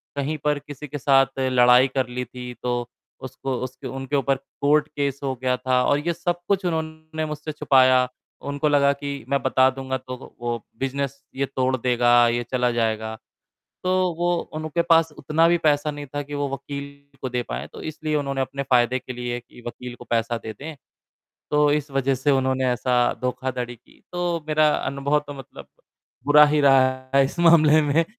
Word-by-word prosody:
कहीं 145 +2 -2
पर 150 -1 +1
किसी 145 0 -9
के 145 +1 -5
साथ 135 -1 +3
लड़ाई 125 0 +5
कर 130 -2 +1
ली 125 +1 -4
थी, 125 +1 -8
तो 120 -1 -1 0.3
उसको 130 0 -4
उसके 130 0 -7
उनके 135 +1 -4
ऊपर 135 0 +2 0.3
कोर्ट 150 +1 +3
केस 140 -2 -3
हो 135 -1 -1
गया 125 -1 +1
था, 125 0 +1
और 145 0 +2
ये 170 - +2
सब 175 +1 -2
कुछ 195 -1 +1
उन्होंने 160 -1 -3
मुझसे 150 0 -5
छुपाया। 130 -3 +4 0.3
उनको 145 +2 -2
लगा 140 -1 +4
कि 140 0 -6
मैं 140 -1 +1
बता 130 0 +4
दूँगा, 130 0 -4
तो 130 0 -8
वो - - -14
वो 120 -2 -3 0.2
बिज़नेस 140 +1 -3
ये 140 - 0
तोड़ 130 0 +1
देगा, 120 -1 +4
ये 120 +1 0
चला 125 -1 +1
जाएगा। 110 -1 -1 0.7
तो 185 - +1 0.2
वो 175 +2 -2 0.3
उनके 155 +2 -1
पास 165 -1 +4
उतना 155 +4 +2
भी 175 - +4
पैसा 150 -1 +2
नहीं 145 -1 -7
था 145 - -1
कि 145 +1 -8
वो 145 0 -1
वकील 140 +1 -6 0.3
को 130 - -3
दे 125 0 -2
पाएँ। 60 - -5
तो - - -10
इसलिए 155 0 -4
उन्होंने 140 -2 -2
अपने 140 +1 -2
फ़ायदे 125 -1 +2
के 130 - -8
लिए 120 0 -4
कि 120 - -17
वकील 125 +1 -7
को 120 - -12
पैसा 115 0 0
दे 110 - -7
दें, 150 +8 -9 0.7
तो 150 0 +3
इस 150 0 -1
वज़ह 135 0 +1
से 135 +3 0
उन्होंने 130 -1 +1
ऐसा 125 +1 0 0.3
धोखाधड़ी 125 -1 -3
की। 115 - -25
तो 175 -2 -2
मेरा 155 0 +4
अनुभव 140 +2 0
तो 145 - -7
मतलब 135 -2 -11 0.6
बुरा 150 +1 +8
ही 150 0 +2
रहा 130 -2 +3
है 140 0 +6
इस 140 +6 -5
मामले 155 -2 +6
में, 150 +3 +2
135 Hz, 190 wpm, -23 LUFS, 125-150 Hz, 0.7 s, बुरा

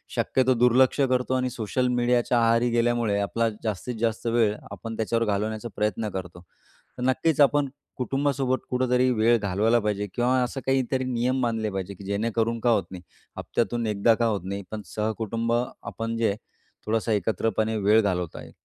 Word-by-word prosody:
शक्यतो 130 0 +2
दुर्लक्ष 125 +3 +4
करतो 130 -1 +1
आणि 130 0 0
सोशल 125 +1 -1
मीडियाच्या 120 0 +2
आहारी 115 +1 +3
गेल्यामुळे 115 -3 +1
आपला 115 +3 0
जास्तीत 110 +3 -3
जास्त 115 0 -1
वेळ 115 -3 +2 0.2
आपण 110 +4 -6
त्याच्यावर 115 +1 0
घालवण्याचा 110 +2 -2
प्रयत्न 105 +1 -1
करतो. 90 -2 -7 0.6
तर 125 - -3
नक्कीच 130 +4 +2
आपण 145 0 +4 0.3
कुटुंबासोबत 135 0 0
कुठेतरी 125 0 +2
वेळ 115 0 +3
घालवायला 105 +3 +2
पाहिजे 105 -1 -1
किंवा 120 +1 +2
असं 130 +2 -4
काहीतरी 130 -1 +1
नियम 130 +1 0
बांधले 115 -3 0
पाहिजे 95 0 -4
की 100 - -12
जेणेकरून 115 +3 -1
का 120 - +2
होत 105 -4 +2
नाही. 90 -2 -8 0.4
हप्त्यातून 120 -1 -1
एकदा 105 +2 +3
का 115 - 0
होत 105 -4 -1
नाही 100 +1 -4
पण 110 -1 -4
सहकुटुंब 110 +1 -1
आपण 115 -1 -3
जे 110 -3 +1 0.5
थोडासा 110 +1 0
एकत्रपणे 110 +2 0
वेळ 105 +2 +4
घालवत 90 -4 -2
आहे. - - -9
115 Hz, 160 wpm, -25 LUFS, 105-125 Hz, 0.6 s, दुर्लक्ष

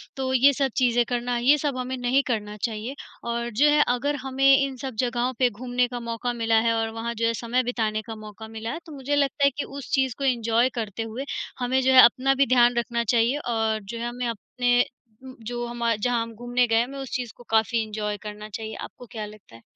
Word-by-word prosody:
तो 260 -1 -2
ये 275 +2 +6
सब 275 0 0
चीज़ें 245 -2 +3
करना, 245 0 -1
ये 265 +5 +4
सब 285 -3 -2
हमें 255 +1 -3
नहीं 250 +3 +2
करना 210 -3 -2
चाहिए 230 +3 -3 0.3
और 235 0 -2
जो 275 +7 +3
है, 295 0 +5
अगर 280 +4 0
हमें 270 +1 +3
इन 275 -1 0
सब 260 -2 -6
जगहों 245 +1 0
पे 250 -2 +4
घूमने 245 +2 -1
का 245 0 -5
मौका 235 +1 -3
मिला 225 -1 +2
है 230 - +3
और 225 0 0
वहाँ 230 +1 -3
जो 230 0 0
है 230 - +1
समय 240 +2 0
बिताने 220 -3 -1
का 225 +1 -8
मौका 215 0 -10
मिला 225 +1 -5
है, 320 - -5
तो 320 - -12
मुझे 280 +1 -1
लगता 280 0 +1
है 280 - +6
कि 290 - -1
उस 275 -1 -9
चीज़ 265 -3 +2
को 280 - -5
एन्जॉय 235 -1 +2
करते 220 0 -3
हुए, 225 +5 -5 0.3
हमें 255 +1 +1
जो 260 - +3
है 255 - +10
अपना 260 +3 +4
भी 275 +1 +4
ध्यान 245 -1 +5
रखना 235 0 0
चाहिए 235 +4 +2
और 225 -5 -1
जो 220 +4 -7
है, 235 - -2
हमें 245 0 -3
अपने 245 +2 +1 0.4
उम, 260 -1 -10
जो 240 +1 -4
हमा 235 -1 0
जहाँ 235 +2 0
हम 230 0 -9
घूमने 245 +2 +1
गए 225 - +1
हैं, 230 - +4
हमें 275 +2 -9
उस 270 - -7
चीज़ 245 -3 -3
को 245 - -14
काफ़ी 225 +1 +2
एन्जॉय 210 -1 -3
करना 210 0 -7
चाहिए। 220 +1 -6
आपको 250 - -9
क्या 220 -3 -5
लगता 210 - -14
है? 115 - -15
240 Hz, 240 wpm, -25 LUFS, 225-260 Hz, 0.4 s, है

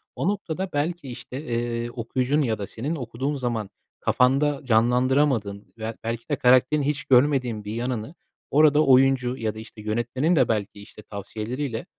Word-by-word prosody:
o - - -2
noktada, 190 -2 -2
belki, 150 +1 -2
işte, 125 +3 -7
eee, 120 -2 -2
okuyucunun 125 +5 0
ya 115 -6 0
da 100 - -4
senin 140 +9 -4
okuduğun 130 +1 -3
zaman 120 -6 -2 0.3
kafanda 140 +3 +2
canlandıramadığın 125 -2 +1
veya, 110 0 -5
belki 115 +3 -4
de, 145 - +1
karakterin 130 +4 +4
hiç 145 -1 -1
görmediğin 125 -4 +2
bir 105 - -4
yanını 120 +4 -3 0.4
orada 150 +1 +5
oyuncu 130 -1 +4
ya 110 -3 -2
da, - - -7
işte, 110 0 -11
yönetmenin 120 +9 0
de, - - +4
belki, 105 -2 -2
işte, 100 - -13
tavsiyeleriyle 110 +5 -5
125 Hz, 155 wpm, -24 LUFS, 115-145 Hz, 0.4 s, orada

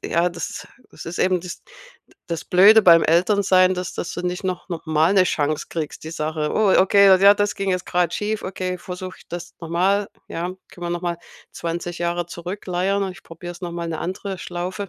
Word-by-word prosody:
ja, 175 +1 +1
das 170 0 -6 0.2
das - - -11
ist 170 +2 -6
eben 185 -1 +2
das 180 - -8 0.7
das 165 -1 -4
Blöde 205 +5 +7
beim 170 -3 +7
Eltern-sein, 185 +1 +3
dass 180 -1 -5
dass - - -4
du 175 - -4
nicht 180 +1 -3
noch 185 0 -3
noch 170 -2 -6
mal 160 +4 +3
'ne 190 -2 +5
Chance 150 -2 -1
kriegst, 155 -2 -5
die 160 - -6
Sache 155 -1 -2
„Oh, 210 -3 +3
okay, 200 +1 +5
ja, 200 +1 +8
das 205 +1 -1
ging 195 -1 -1
jetzt 180 -1 -1
grad 175 -1 0
schief. 215 +1 -2
Okay, 185 -1 -4
versuche 185 +1 -7
ich - - -19
das 175 0 -7
noch 165 - -7
mal. 195 +4 +1 0.2
Ja, 165 - -4 0.3
können 175 -1 -7
wir - - -3
noch 175 - -2
mal 170 -1 -2 0.3
20 170 +1 -5
Jahre 175 0 -1
zurückleiern 180 +2 -2
und 190 - -2
ich 185 - -14
probier's 175 +2 -9
noch 175 -1 -5
mal 170 -1 -4
'ne 160 - -4
andere 190 +1 -4
Schlaufe.“ 180 +3 -5
180 Hz, 210 wpm, -22 LUFS, 170-190 Hz, 0.7 s, ja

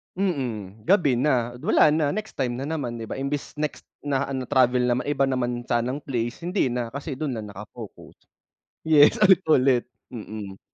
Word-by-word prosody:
Mm, 120 - -3
gabi 165 -8 +3
na, 120 -2 +1
wala - - +5
na, 155 0 +2
next 215 +1 -5
time 130 -3 -1
na 140 - -4
naman 130 -7 -3
'di 110 - -6
ba, - - -5
imbes 140 +2 -4
next 150 0 -4 0.2
na 140 -1 0
ano 130 -2 -3
travel 125 -1 +3
naman 125 +3 0
iba 140 -2 +1
naman 125 -2 -1
sanang 125 +4 -1
place 120 +3 -3
hindi 180 -4 +1
na, 120 -1 -3
kasi 140 0 -5
do'n 130 -5 -3
na - - -6
naka-focus. 105 +2 -11 0.6
Yes, 150 -2 +6
ulit-ulit, 140 - +4 0.2
mm. 105 -4 -8
130 Hz, 170 wpm, -24 LUFS, 120-145 Hz, 0.6 s, Yes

